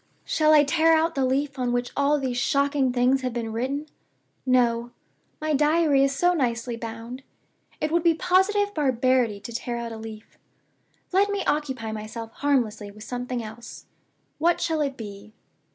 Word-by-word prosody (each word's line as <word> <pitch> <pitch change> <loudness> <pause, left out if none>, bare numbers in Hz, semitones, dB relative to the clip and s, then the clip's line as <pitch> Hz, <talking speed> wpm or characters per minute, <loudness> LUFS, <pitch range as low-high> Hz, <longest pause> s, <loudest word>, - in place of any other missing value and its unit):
"Shall 310 -1 +3
I 300 -1 +7
tear 325 +3 +3
out 325 +1 +2
the 270 -3 +1
leaf 275 +1 -1
on 250 -1 0
which 245 0 -1
all 285 +1 +3
these 255 -3 -2
shocking 280 0 +1
things 250 +2 +2
have 255 -2 -3
been 230 -2 -3
written? 270 +6 -2 0.6
No. 240 -2 +2 0.5
My 310 0 -1
Diary 300 -1 +3
is 275 - +2
so 350 +6 +2
nicely 240 -5 -1
bound 230 +2 -7 0.6
it 305 - -1
would 340 +1 +3
be 335 -1 +3
positive 390 +4 +2
barbarity 255 - +1
to 235 - -8
tear 235 +1 -3
out 235 -1 -5
a 225 - -6
leaf. 220 -1 -10 0.7
Let 395 +2 +3
me 405 -1 -2
occupy 265 -7 -1
myself 220 +1 -6
harmlessly 235 -8 0
with 210 +1 -12
something 245 +1 -4
else. 220 +2 -10 0.5
What 340 +2 +2
shall 320 -2 0
it 275 -2 -2
be? 205 -1 -9
260 Hz, 170 wpm, -25 LUFS, 235-300 Hz, 0.7 s, I